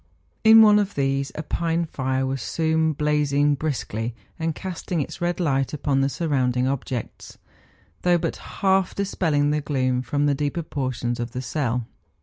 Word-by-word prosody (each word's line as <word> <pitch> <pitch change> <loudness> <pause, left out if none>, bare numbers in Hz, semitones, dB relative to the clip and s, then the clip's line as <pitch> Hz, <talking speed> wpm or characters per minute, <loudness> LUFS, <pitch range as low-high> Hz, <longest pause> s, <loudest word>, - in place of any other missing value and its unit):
In 220 0 +9
one 210 -1 +6
of 205 -1 -2
these 135 0 0
a 155 - -4
pine 170 +2 -1
fire 130 -3 -1
was 135 0 -2
soon 160 -1 +1
blazing 145 -1 +2
briskly, 120 -6 -3 0.2
and 160 -1 -1
casting 180 -2 -4
its 145 - -4
red 175 +1 -1
light 135 -5 0
upon 140 -2 +1
the 135 - +2
surrounding 130 -5 0
objects, 130 -3 -4 0.6
though 175 -1 +4
but - - -2
half 190 -1 0
dis¬ 200 0 -3
pelling 145 -4 +2
the 150 0 0
gloom 130 -3 0
from 145 +2 0
the 145 - +3
deeper 145 +4 -2
portions 130 -5 -3
of 120 0 -4
the 125 - -3
cell. 125 -2 -1
145 Hz, 165 wpm, -24 LUFS, 130-165 Hz, 0.6 s, In